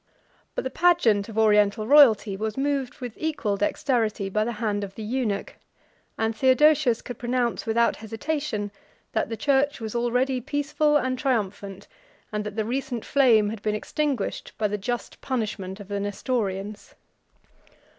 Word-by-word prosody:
But - - -2
the 260 - -3
pageant 245 -12 +3
of 220 - -8
Oriental 210 0 +3
royalty 225 -7 +6
was 215 +3 -3
moved 275 -2 -1
with 245 -3 -5
equal 300 -10 -1
dexterity 215 0 0
by 215 +2 +1
the 235 +2 -2
hand 210 -2 -2
of 195 -1 -7
the 220 - -6
eunuch; 220 -3 -2 0.6
and 225 0 0
Theodosius 270 -1 +4
could 245 - -8
pronounce, 240 -1 -1
without 235 +1 +2
hesitation, 225 -1 -3 0.4
that - - -1
the 225 - -4
church 285 +1 +1
was 220 -2 -5
already 250 +2 0
peaceful 295 +2 +1
and 255 -3 -1
triumphant, 205 -6 -2 0.4
and 210 -1 -2
that 210 -1 -6
the 220 -1 -1
recent 250 -1 -3
flame 230 -7 +4
had 220 -2 -7
been 210 0 0
extinguished 275 0 -2
by 215 - +1
the 210 - -2
just 240 +5 -4
punishment 210 -6 -3
of 200 - -10
the 200 0 -3
Nestorians. 205 -1 -3
225 Hz, 155 wpm, -25 LUFS, 210-265 Hz, 0.6 s, royalty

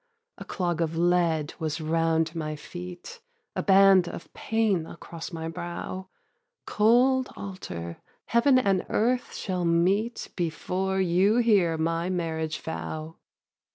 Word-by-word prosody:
A - - -8
clog 175 -3 -2
of 165 0 -1
lead 170 -3 +2
was 155 -1 -2
round 165 0 +1
my 155 -2 -3
feet, 180 - -9 0.3
A - - 0
band 195 -2 +6
of - - -8
pain 215 -7 0
across 170 0 -8
my 160 -1 -5
brow; 175 +3 -6 0.6
'Cold 250 +4 +3
altar, 85 - -7 0.2
Heaven 250 +3 +4
and 195 -7 +2
earth 245 +3 0
shall 185 -3 -2
meet 185 +7 +1
Before 185 +3 -1
you 190 +3 +3
hear 200 -9 +3
my 165 +2 -1
marriage 160 -3 -2
vow.' 160 0 -6
175 Hz, 120 wpm, -27 LUFS, 165-195 Hz, 0.6 s, band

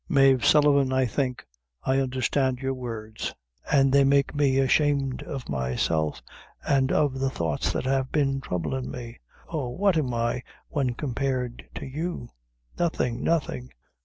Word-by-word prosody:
Mave 135 -3 +5
Sullivan, 145 -3 +5
I 130 0 +3
think 125 +1 -2 0.4
I 135 +1 +2
understand 130 0 0
your 135 +1 -2
words, 115 -4 -5 0.4
an' 135 -2 +4
they 140 0 +6
make 140 0 +3
me 140 -3 +2
ashamed 135 0 +2
of 135 -4 -6
myself, 70 +4 -1 0.4
an' 135 -2 +3
of 140 -3 +1
the 135 0 +1
thoughts 85 -10 -1
that - - -2
have 135 0 0
been 135 -3 +1
troublin' 110 +6 -3
me. 120 -1 -8 0.3
Oh, 150 -6 -3
what 185 +6 +2
am 135 -5 0
I 120 +1 -1 0.3
when 130 -5 -1
compared 130 -2 -3
to - - -5
you? 150 -1 -4 0.5
nothing 125 -8 0
nothing." 145 -6 -1
130 Hz, 145 wpm, -26 LUFS, 125-140 Hz, 0.5 s, they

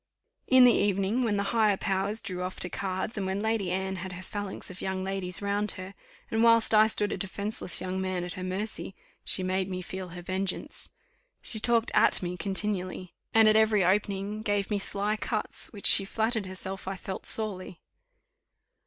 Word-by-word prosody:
In 260 -1 +7
the 245 -1 +7
evening, 200 +4 +1
when 220 -4 +1
the 200 - 0
higher 215 -4 +3
powers 195 +3 -1
drew 180 -4 -4
off 185 0 -4
to 180 - -2
cards, 190 +5 -3
and 195 -2 -2
when 190 +1 -1
Lady 220 -4 0
Anne 190 +1 -2
had 185 +1 -6
her 185 +1 -8
phalanx 205 -1 -6
of 185 - -10
young 190 0 -2
ladies 190 0 -3
round 205 +1 0
her; 185 +1 -8 0.4
and 225 - +1
whilst 230 -1 +5
I 215 0 +7
stood 210 -1 0
a - - -2
defenceless 200 0 -1
young 185 0 -3
man 185 -1 -2
at 175 - -5
her 185 - -7
mercy, 190 +1 -3 0.3
she 185 - +2
made 185 +1 -1
me 185 -1 -4
feel 185 +1 -6
her 175 +1 -9
vengeance. 190 +2 -2 0.5
She 220 - +4
talked 230 +1 +3
at - - +3
me 175 0 -3
continually, 185 -1 -2 0.2
and 225 -1 +6
at 215 - +5
every 215 -3 +4
opening 200 +2 0
gave 205 -2 -1
me 205 - +1
sly 205 +2 -1
cuts, 215 0 -1
which 205 -3 -10
she 195 - +8
flattered 220 +1 -1
herself 190 0 -6
I 195 - -2
felt 190 0 -6
sorely. 190 -5 +1
195 Hz, 190 wpm, -28 LUFS, 185-215 Hz, 0.5 s, she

